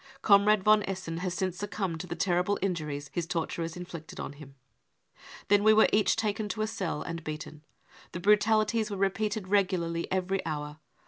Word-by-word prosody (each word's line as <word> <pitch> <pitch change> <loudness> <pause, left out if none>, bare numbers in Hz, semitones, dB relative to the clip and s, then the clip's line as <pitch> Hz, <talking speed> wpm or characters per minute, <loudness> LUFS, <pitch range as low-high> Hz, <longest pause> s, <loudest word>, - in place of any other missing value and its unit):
Comrade 205 0 +5
von 215 +1 +5
Essen 185 -4 -4
has 180 0 -3
since 185 -1 -2
succumbed 195 -5 -3
to 180 - -6
the 170 - -4
terrible 180 +3 +1
injuries 150 -6 -3
his 170 -2 -2
torturers 165 0 -3
inflicted 170 -3 -8
on - - -5
him.... 140 -2 -13 0.4
" - - -19
Then 205 0 +4
we 215 0 +6
were 220 - +6
each 210 0 +3
taken 215 -1 -1
to 215 +3 -2
a - - +1
cell 190 -8 -3
and 165 0 -6
beaten. 155 0 -7 0.5
The 170 - -5
brutalities 215 +2 +3
were 200 - -4
repeated 200 +1 -1
regularly 180 -4 0
every 190 +1 0
hour. 150 -1 -5
185 Hz, 180 wpm, -29 LUFS, 165-205 Hz, 0.5 s, we